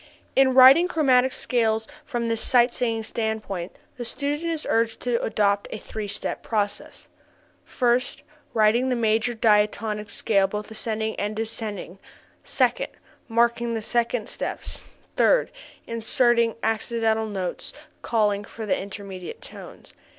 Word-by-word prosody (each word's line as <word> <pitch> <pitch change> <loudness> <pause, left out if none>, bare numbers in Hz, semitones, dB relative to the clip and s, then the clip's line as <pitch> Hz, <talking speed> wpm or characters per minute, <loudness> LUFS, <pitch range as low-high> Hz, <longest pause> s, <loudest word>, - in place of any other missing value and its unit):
_ - - -24 0.3
In 265 -1 +4
writing 265 +7 +8
chromatic 265 -7 +3
scales 225 -4 0 0.2
from 240 -5 -3
this 230 -1 0
sight 245 -1 +4
singing 230 -2 0
standpoint 220 -5 -3 0.2
the 245 - -4
student 290 +7 -2
is 320 -2 -3
urged 230 0 +1
to 245 -1 0
adopt 200 -2 +1
a - - -5
three 215 0 -6
step 205 +1 -3
process; 205 -2 -3 0.6
first, 245 0 0 0.3
writing 225 +4 +3
the 250 - +1
major 225 +1 +1
diatonic 210 -1 +1
scale 195 -3 +2
both 210 +2 -6
ascending 220 0 -2
and 210 +1 -2
descending; 215 -4 -4 0.4
second, - - +1 0.4
marking 235 0 +1
the 225 +2 +1
half 230 -4 -2
steps; - - -4 0.3
third, - - +3 0.3
inserting 230 0 +2
accidental 220 0 0
notes 190 -4 -4 0.3
calling 210 -3 +1
for 220 +1 -8
the 205 - +1
intermediate 195 -2 -7
tones. - - -11
225 Hz, 130 wpm, -24 LUFS, 210-240 Hz, 0.6 s, writing